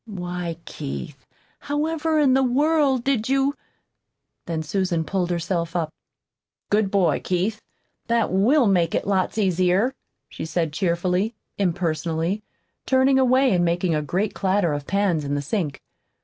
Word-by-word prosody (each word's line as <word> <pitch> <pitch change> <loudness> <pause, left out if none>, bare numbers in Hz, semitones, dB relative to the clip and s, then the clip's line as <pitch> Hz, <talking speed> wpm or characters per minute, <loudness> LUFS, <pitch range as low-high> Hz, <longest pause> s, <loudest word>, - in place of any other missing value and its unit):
"Why, 180 -4 -4
Keith, 140 -1 -7 0.3
however 315 +2 -1
in 285 -4 +4
the 265 - +4
world 275 0 +2
did 255 -4 0
you 275 +1 +2 0.5
" - - -56
Then 160 -2 -2
Susan 175 0 -1
pulled 180 +1 -1
herself 170 0 -2
up. 160 -3 -1 0.8
"Good 210 -1 +3
boy, 190 -6 +2
Keith! 190 +4 -1 0.5
That 235 -1 +1
WILL 240 +9 +4
make 175 -5 +2
it - - -1
lots 195 +1 0
easier," 185 +4 +2 0.3
she - - -8
said 160 -1 -1
cheerfully, 180 +5 0 0.2
impersonally, 170 +1 -1 0.5
turning 265 0 +4
away 260 -1 +4
and 175 -1 +2
making 175 0 +1
a 155 - +1
great 190 +8 -1
clatter 190 -4 +1
of 145 -1 -5
pans 195 -6 +1
in 145 0 -2
the 145 - -1
sink. 150 -3 -2
190 Hz, 145 wpm, -23 LUFS, 170-240 Hz, 0.8 s, in